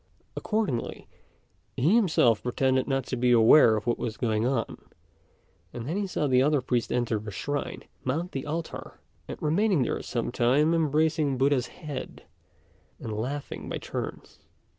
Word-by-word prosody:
Accordingly, 210 - -2 0.7
he 155 +10 +3
himself 160 - +3
pretended 130 +1 +1
not 135 -2 0
to - - -3
be 125 0 +1
aware 115 0 +7
of 105 - -3
what 120 - 0
was 110 -2 -4
going 110 -1 0
on; 125 -4 -3 0.9
and 120 +1 -6
then 165 - -2
he 200 0 -1
saw 170 -4 -1
the 130 -2 +3
other 145 +1 +3
priest 125 -2 -1
enter 120 -3 0
the 105 +1 -7
shrine, 145 +9 -4 0.2
mount 160 +8 -2
the 135 +1 -5
altar, 160 +2 -5 0.3
and - - -7
remain 170 0 +2
there - - -2
some 120 -1 -3
time 135 +7 +3
embracing 155 -3 +1
Buddha's 135 -2 +2
head, 150 -5 -8 0.8
and 110 - -5
laughing 130 +7 -5
by - - -3
turns. - - -6
135 Hz, 155 wpm, -27 LUFS, 120-155 Hz, 0.9 s, aware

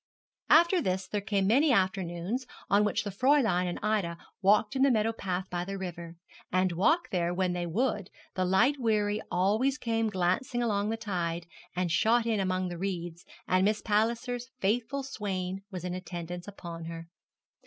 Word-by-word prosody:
After 340 +3 +6
this 185 -5 -1
there 205 - -2
came 200 -1 0
many 270 +9 +4
afternoons 190 +3 0 0.2
on 205 +1 +5
which 210 - 0
the 205 - -4
Fräulein 225 -5 +3
and 175 - -3
Ida 205 -6 0 0.2
walked 210 +4 +3
in 265 - 0
the 275 - +6
meadow 225 -2 +2
path 185 -3 -3
by 175 -1 -1
the 195 +2 -5
river, 170 -3 -6 0.4
and 185 0 +2
walk 305 - +2
there 175 -2 +1
when 185 -1 +1
they 175 -1 -2
would, 205 +1 -1 0.2
the 185 - 0
light 230 +10 +3
wherry 210 -3 +1
always 215 +10 +2
came 225 -4 0
glancing 200 +6 0
along 205 -2 0
the 225 - -1
tide, 175 -6 -3 0.3
and 180 -1 0
shot 230 +6 +3
in 225 -3 +1
among 185 -1 0
the 175 -1 -6
reeds, 175 -3 -4 0.2
and 185 0 +3
Miss 210 +2 +1
Palliser's 235 +3 0
faithful 245 +7 0
swain 195 -6 -3
was 185 -4 -6
in 180 -1 -3
attendance 175 0 -6
upon 170 -4 -8
her. 165 0 -7
195 Hz, 175 wpm, -29 LUFS, 180-225 Hz, 0.4 s, After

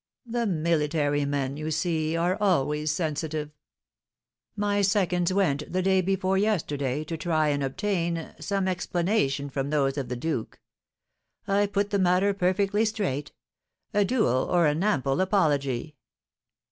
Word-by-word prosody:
"The 235 -1 -1
military 155 -4 +1
men, 140 -1 -2
you 155 +1 -4
see, 160 0 0
are 175 +2 +1
always 150 -5 +1
sensitive. 155 -1 -2 1.0
My 205 -1 +1
seconds 185 -3 +2
went, 150 -7 0
the 185 +1 0
day 190 0 +3
before 190 +1 +1
yesterday, 150 -9 0
to 165 +2 -5
try 155 -1 +1
and 145 -1 0
obtain 170 +3 -2
some 195 -1 -1
explanation 175 -6 0
from 135 0 -3
those 140 -2 +1
of 135 - -5
the 125 - -2
duke. 125 -2 -3 0.9
I 200 +1 +2
put 200 0 -1
the 200 - +1
matter 185 +2 +3
perfectly 195 +3 +1
straight, 200 -11 -2 0.6
a 205 - +4
duel 185 - +1
or 175 -2 +3
an 150 +4 +1
ample 140 -7 +1
apology." 150 - 0
170 Hz, 135 wpm, -26 LUFS, 145-195 Hz, 1.0 s, a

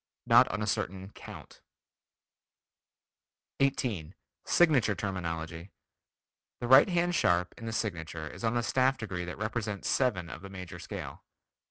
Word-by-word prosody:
Not - - +7
on 105 +1 -3
a - - 0
certain 95 -1 -2
count. - - -12 2.0
18. 115 - 0 0.3
Signature 135 -12 +4
Terminology: 85 -2 -4 0.9
The 120 - -3
right 130 +8 +8
hand 175 0 +1
sharp 90 - +2
in 115 - -8
the - - -2
signature 85 -8 -3
is 75 - -10
on 115 +1 +1
the 120 - +1
staff 130 +2 +2
degree 90 -5 -4
that 85 - -6
represents 110 -1 -3
seven 105 -10 +1
of 85 - -8
the 100 - -9
major 90 -2 -8
scale. - - -7
100 Hz, 140 wpm, -30 LUFS, 90-120 Hz, 2.0 s, right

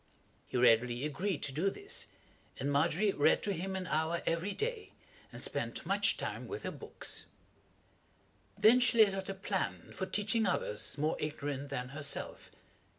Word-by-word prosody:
He - - -2
readily 120 +2 +4
agreed 160 +3 -2
to 140 - -1
do 165 +8 +1
this, 400 - -2 0.5
and 140 +2 -1
Margery 175 +8 +2
read 150 -2 +3
to 205 - 0
him 190 +2 -3
an 190 -1 -3
hour 160 +2 0
every 170 +5 0
day, 445 - -3 0.4
and - - -8
spent - - -2
much - - +3
time - - -4
with - - -6
her - - -3
books. - - -5 1.3
Then 230 +4 +6
she 245 -1 +3
laid 210 -3 +7
out 195 0 -4
a 195 - -3
plan 195 0 -3
for 190 - -4
teaching 220 +1 +2
others 105 -7 0
more 155 +2 0
ignorant 145 -2 -3
than 125 -2 -4
herself. 145 +1 -2
170 Hz, 160 wpm, -33 LUFS, 140-200 Hz, 1.3 s, laid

